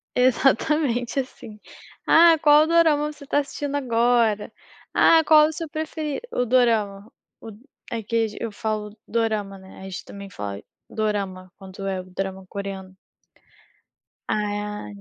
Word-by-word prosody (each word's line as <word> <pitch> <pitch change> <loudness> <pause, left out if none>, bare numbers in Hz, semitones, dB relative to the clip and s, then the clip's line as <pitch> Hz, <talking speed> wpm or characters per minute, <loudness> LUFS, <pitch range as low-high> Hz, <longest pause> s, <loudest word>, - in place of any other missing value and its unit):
Exatamente 255 0 +2
assim. 235 -4 -8 0.5
Ah, 330 0 +7
qual 295 0 +6
o - - -1
dorama 315 -3 +3
você 295 -1 -14
está 290 +1 +1
assistindo 285 0 -4
agora? 235 -5 +1 0.4
Ah, 325 -1 +5
qual 305 -1 +7
o - - -3
seu 330 +1 -5
preferi 310 0 -4
o 250 - 0
dorama, 220 -4 +1 0.3
o - - -9 0.4
é 230 -2 -3
que 230 +1 0
age 215 -1 -8
eu 230 - -4
falo 210 0 -4
dorama, 215 -4 -1
né, 190 0 -14
a 190 - -11
gente 190 -1 -7
também 200 0 -10
fala 100 - -6 0.3
dorama, 195 -4 -3
quanto 195 0 -9
é 190 -1 -2
o - - -12
drama 190 +1 -6
coreano. 195 -1 -7 1.3
Ah. 210 - -3
225 Hz, 145 wpm, -23 LUFS, 200-285 Hz, 1.3 s, Ah